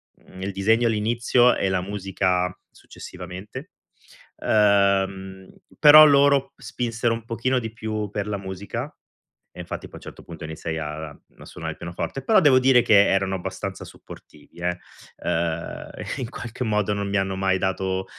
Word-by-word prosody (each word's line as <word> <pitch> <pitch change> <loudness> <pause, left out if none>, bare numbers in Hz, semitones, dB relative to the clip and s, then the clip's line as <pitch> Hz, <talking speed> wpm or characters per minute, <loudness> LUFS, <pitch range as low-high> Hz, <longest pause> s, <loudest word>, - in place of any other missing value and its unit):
mhmm, 95 - -15
il 100 +1 -3
disegno 110 +5 +2
all'inizio, 120 +3 +2
e 95 - 0
la 95 -1 0
musica 95 -2 -1 0.2
successivamente. 95 - -10 0.7
Ehm, 95 -2 +1 0.3
però 155 +1 +10
loro 140 -1 +4
spinsero 120 -2 -2
un 115 -1 -5
pochino 125 +2 -1
di 115 -2 -6
più 110 -2 -4
per 105 0 -4
la 105 -1 -2
musica 95 0 -6 0.6
e - - -11
infatti - - -6
poi, - - -21
a - - -7
un - - -11
certo - - -11
punto, 80 -2 -10
iniziai 80 +1 -5
a 75 0 -5
a - - -18
suonare - - -6
il - - -14
pianoforte. 85 +10 -5
Però 215 +3 +4
devo 140 -5 +5
dire 130 -2 +5
che 100 -1 +5
erano 95 0 +1
abbastanza 90 - -6
supportivi, - - -15
eh, 90 0 -1 0.4
ehm, 85 -1 -3 0.3
in 125 - -4
qualche 120 +1 -6
modo 105 -1 0
non 100 0 -3
mi 100 - -1
hanno 95 0 -1
mai 95 0 +1
dato, 95 0 -2
100 Hz, 160 wpm, -23 LUFS, 95-115 Hz, 0.7 s, però